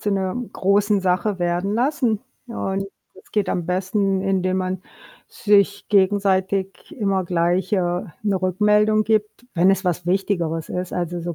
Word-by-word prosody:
zu 205 - -1
'ner 190 +1 -1 0.2
großen 200 +1 +2
Sache 185 +1 0
werden 175 +4 0
lassen 245 -4 +1 0.3
und 195 -4 -3 0.3
es 185 - -19
geht 205 -3 0
am 175 -2 -2
besten, 190 +1 0
indem 190 -1 0
man 185 0 -3 0.4
sich 200 -1 +1
gegenseitig 195 -1 +1
immer 195 -4 0
gleich, 175 +2 0
äh, 205 - +4 0.4
'ne 200 -3 0
Rückmeldung 210 +3 +3
gibt, 215 +2 -1
wenn 175 +1 +4
es 195 0 -2
was 175 -1 -1
Wichtigeres 175 -4 -1
ist. 180 0 -4
Also, 175 0 -3
so 170 0 -4
190 Hz, 150 wpm, -22 LUFS, 180-205 Hz, 0.4 s, äh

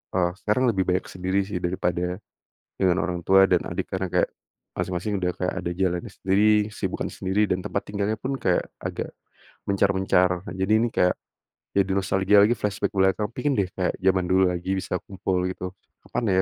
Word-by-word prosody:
eee, 90 -1 +2
sekarang 110 +5 +2
lebih 95 -3 +1
banyak 90 +1 +1
sendiri 95 +2 0
sih 100 -4 -3
daripada, 90 0 -1 0.6
dengan 95 -1 +3
orang 90 -1 -2
tua 95 0 +7
dan 90 -2 +3
adik - - -3
karena 95 0 -1
kayak, - - +2 0.5
masing-masing 95 +3 -2
udah 90 -1 0
kayak 90 - -2
ada 85 -1 -3
jalannya 90 -2 0
sendiri, 95 +2 +1 0.3
kesibukan - - -3
sendiri, 95 +2 -1
dan 90 - +1
tempat 100 - -1
tinggalnya 100 +1 -1
pun 130 +6 -4
kayak 90 - +2 0.2
agak, - - -4 0.6
mencar-mencar. 95 -2 +2
Nah - - -5
jadi 95 +3 +1
ini 120 - +2
kayak, 90 0 +3 0.6
jadi 100 -1 +2
nostalgia 95 +1 +3
lagi, 110 - +4
flashback 100 -1 -1
ke - - -7
belakang, 95 +2 +2
pingin 145 -1 0
deh 95 -2 +1
kayak 90 -1 0
zaman 95 -1 +2
dulu 95 0 +4
lagi 90 +2 -2
bisa 90 0 -2
kumpul 95 -1 -1
gitu 90 0 -6 0.3
kapan 115 -5 -1
95 Hz, 180 wpm, -25 LUFS, 90-100 Hz, 0.6 s, tua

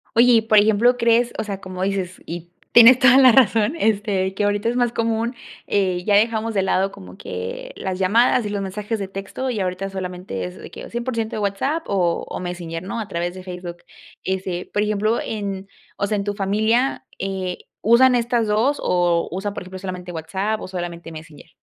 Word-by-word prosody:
Oye, 245 +2 +6
y 225 - +6
por 220 -1 +3
ejemplo, 220 +4 +4
crees, 235 0 +3
o - - 0
sea, 200 -2 -5
como 185 0 -5
dices 190 -2 -2
y 170 +1 -7 0.2
tienes 240 +2 +9
toda 265 -1 +7
la 260 -2 +8
razón, 230 +1 +3
este, 200 -4 +1
que 205 - -1
ahorita 205 +2 0
es 235 - 0
más 245 -1 +2
común, 230 +1 -1 0.3
eh, 185 -3 0
ya 205 - +3
dejamos 225 +1 +2
de 195 -2 +1
lado 190 +1 +1
como 90 - -12
que 90 0 -6
las 190 -1 -3
llamadas 225 +5 +3
y - - -2
los 205 -1 -2
mensajes 210 +3 -4
de 195 - -3
texto 195 +7 -5
y 225 -5 -2
ahorita 185 +1 -3
solamente 180 - -5
es 90 0 -7
de - - -10
que - - -10
o - - -9
100% 235 -2 -3
de - - -2
WhatsApp 215 +11 -1
o 180 -4 0
o - - -5
Messenger, 175 -2 -5
¿no?, 195 +5 -4
a 215 - -4
través 175 -2 -3
de 185 - -9
Facebook. 180 -1 -7 0.5
Este, 185 -1 -3
por 205 - +1
ejemplo, 215 +2 0
en 200 -3 -5 0.3
o - - -1
sea, 210 0 0
en 200 - -3
tu 205 - -1
familia, 220 +6 0
eh, 190 -2 -3 0.2
¿usan 240 +4 +5
estas 235 -1 +1
2 225 +8 +1
o 175 -1 +1
usan, 195 +3 -3
por - - -6
ejemplo, 185 +1 -9
solamente 185 -1 -6
WhatsApp 190 +6 -2
o - - -7
solamente 175 -2 -6
Messenger? 155 -2 -12
200 Hz, 205 wpm, -21 LUFS, 185-225 Hz, 0.5 s, tienes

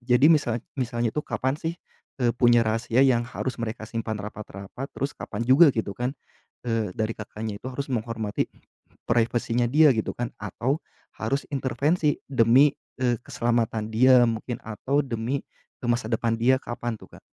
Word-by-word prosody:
jadi 130 +4 +5
misal 120 -7 +1 0.2
misalnya 120 -2 -1
tuh 150 - -2
kapan 130 +3 -1
sih, 165 +1 -3 0.5
eee, 120 - +4
punya 120 -1 +4
rahasia 115 +3 +2
yang 120 -3 +3
harus 130 0 -4
mereka 115 0 -4
simpan 110 0 -3
rapat-rapat, 105 +4 -7
terus 140 +1 -2
kapan 105 +2 -4
juga 140 +4 +7
gitu 110 -3 -1
kan, 125 +5 -2 0.5
eee, 115 -4 0
dari 110 0 -1
Kakaknya 110 -1 -6
itu 125 - -7
harus 140 +3 -4
menghormati 110 -3 -2 0.6
privacy-nya 120 +1 +1
dia 150 +1 +7
gitu 110 - -1
kan, 120 -1 -3
atau 120 - -2 0.4
harus 135 +6 -1
intervensi 145 +4 +1 0.2
demi, 130 +3 +5 0.3
eee, 120 -2 +1
keselamatan 115 -2 -1
dia 125 +2 +6
mungkin 115 +1 -3
atau 130 +6 0
demi, 120 +1 -2 0.4
eee, 120 - -1
masa 120 -2 -1
depan 115 0 +1
dia, 125 +3 +5
kapan 120 -1 -4
tuh - - -15
Kak? - - -44
120 Hz, 160 wpm, -25 LUFS, 110-130 Hz, 0.6 s, juga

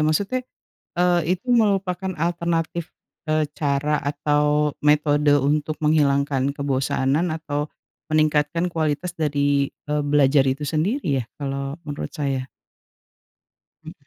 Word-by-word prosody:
Maksudnya, 195 +11 +1 0.6
eee, 175 0 +3 0.2
itu 190 - -33
merupakan 195 -5 +1
alternatif, 170 0 -1 0.4
eee, 155 0 +2
cara 145 +1 +1
atau 150 +1 +1
metode 150 0 +3
untuk 150 +2 0
menghilangkan 140 -2 +2
kebosanan 140 +3 0
atau 150 -2 -3 0.4
meningkatkan 155 +1 +2
kualitas 160 +1 -1
dari, 145 -3 +1 0.2
eee, 150 0 0
belajar 145 -1 +4
itu 135 +3 -1
sendiri 155 - 0
ya - - -5
kalau 140 0 -4
menurut 145 -1 -5
saya. 135 -3 -2 1.4
Mhm. 160 - -8
150 Hz, 105 wpm, -23 LUFS, 145-165 Hz, 1.4 s, belajar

